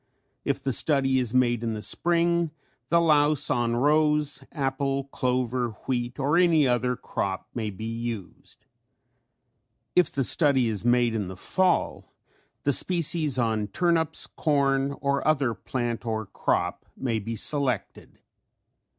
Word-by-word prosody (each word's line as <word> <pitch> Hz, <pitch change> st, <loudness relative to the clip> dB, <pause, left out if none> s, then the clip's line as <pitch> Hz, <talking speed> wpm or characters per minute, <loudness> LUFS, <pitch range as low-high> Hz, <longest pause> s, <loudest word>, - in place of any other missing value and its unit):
If -, -, -2 dB
the 135 Hz, -, 0 dB
study 135 Hz, +1 st, +3 dB
is 125 Hz, -1 st, -1 dB
made 120 Hz, -2 st, +2 dB
in 115 Hz, -2 st, -2 dB
the 105 Hz, -, -6 dB
spring 170 Hz, +2 st, +1 dB, 0.4 s
the 170 Hz, -, +4 dB
louse 150 Hz, -3 st, +3 dB
on 120 Hz, -1 st, 0 dB
rose, 150 Hz, +1 st, +1 dB
apple, 135 Hz, -1 st, -2 dB
clover, 125 Hz, -3 st, -2 dB
wheat 120 Hz, -1 st, -2 dB
or 145 Hz, +4 st, +1 dB
any 165 Hz, -5 st, +4 dB
other 125 Hz, 0 st, 0 dB
crop 95 Hz, -4 st, -4 dB
may 110 Hz, -3 st, -3 dB
be 105 Hz, +2 st, -8 dB
used. 115 Hz, -3 st, -7 dB, 1.3 s
If 180 Hz, -, +3 dB
the 135 Hz, -, -1 dB
study 135 Hz, -3 st, +3 dB
is 110 Hz, -2 st, -2 dB
made 120 Hz, -1 st, +2 dB
in 105 Hz, -4 st, -2 dB
the 95 Hz, 0 st, -8 dB
fall 185 Hz, -, 0 dB, 0.5 s
the 145 Hz, -, +3 dB
species 160 Hz, -4 st, +2 dB
on 110 Hz, -3 st, 0 dB
turnips, 165 Hz, -, 0 dB
corn 140 Hz, -2 st, 0 dB
or 140 Hz, 0 st, 0 dB
other 140 Hz, -6 st, +2 dB
plant 120 Hz, -1 st, -4 dB
or 110 Hz, -2 st, -3 dB
crop -, -, -2 dB
may 115 Hz, -4 st, -1 dB
be 115 Hz, +3 st, -5 dB
selected. 130 Hz, -1 st, -1 dB
130 Hz, 135 wpm, -26 LUFS, 115-150 Hz, 1.3 s, the